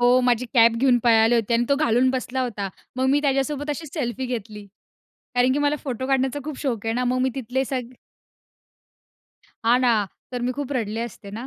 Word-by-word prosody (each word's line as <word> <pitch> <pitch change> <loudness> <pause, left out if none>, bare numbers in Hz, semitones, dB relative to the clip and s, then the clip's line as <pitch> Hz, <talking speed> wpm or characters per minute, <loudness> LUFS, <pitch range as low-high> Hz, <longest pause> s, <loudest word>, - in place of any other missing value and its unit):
हो, 245 +1 +5
माझी 245 -1 +1
कॅप 230 -1 +6
घेऊन 250 0 +4
पळाले 225 0 +5
होते. 230 0 0
आणि 235 +1 +2
तो 280 - +4
घालून 260 -3 +3
बसला 260 0 -2
होता. 215 -5 -3 0.3
मग 260 +1 +1
मी 285 +1 +3
त्याच्यासोबत 285 +1 0
अशीच 295 0 -6
सेल्फी 260 -4 -2
घेतली. 215 -4 -6 0.7
कारण 245 +1 +4
की 285 - 0
मला 290 0 +2
फोटो 260 -2 -3
काढण्याचा 270 +1 +1
खूप 300 -2 -6
शौक 235 -7 -2
आहे 225 - 0
ना, 250 +2 0
मग 250 +1 +1
मी 260 - +2
तिथले 265 0 -1
सग 255 -2 -4 1.7
हां 240 +2 +5
ना. - - +5 0.4
तर 245 -1 -4
मी 250 - 0
खूप 285 -1 -4
रडले 220 -1 -3
असते 200 -3 -13
ना. - - -6
250 Hz, 200 wpm, -23 LUFS, 235-270 Hz, 1.7 s, कॅप